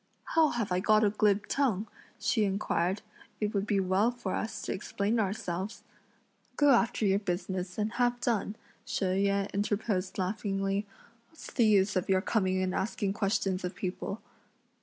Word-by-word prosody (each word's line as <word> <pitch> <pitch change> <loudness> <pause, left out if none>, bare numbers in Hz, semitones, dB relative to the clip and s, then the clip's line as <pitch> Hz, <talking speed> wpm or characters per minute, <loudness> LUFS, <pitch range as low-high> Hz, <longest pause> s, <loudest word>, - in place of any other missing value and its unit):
"How 320 -2 +5
have 230 -7 -2
I 180 - +2
got 215 +2 +4
a 205 - +4
glib 210 -1 +2
tongue?" 230 -8 +1 0.3
she 220 - +1
inquired; 195 -1 0 0.4
"it 210 -1 -1
would 200 0 0
be 205 -2 +2
well 190 +4 +2
for 240 -6 -4
us 220 - -3
to - - -2
explain 200 +3 -1
ourselves." 190 -1 -3 0.7
"Go 290 -1 +5
after 230 -3 +3
your 195 0 +3
business, 180 -1 -3
and 215 0 0
have 245 0 +1
done," 220 -3 0 0.3
She 195 - -2
Yüeh 200 +1 +1
interposed 205 -1 -1
laughingly; 195 +1 -1 0.4
"what's 320 - -12
the 235 -3 +4
use 205 -1 +4
of 185 - -1
your 190 -1 +4
coming 190 -3 +1
and 185 0 -1
asking 200 -1 -1
questions 195 -2 0
of 180 +1 -4
people?" 195 +3 -4
200 Hz, 160 wpm, -30 LUFS, 190-220 Hz, 0.7 s, How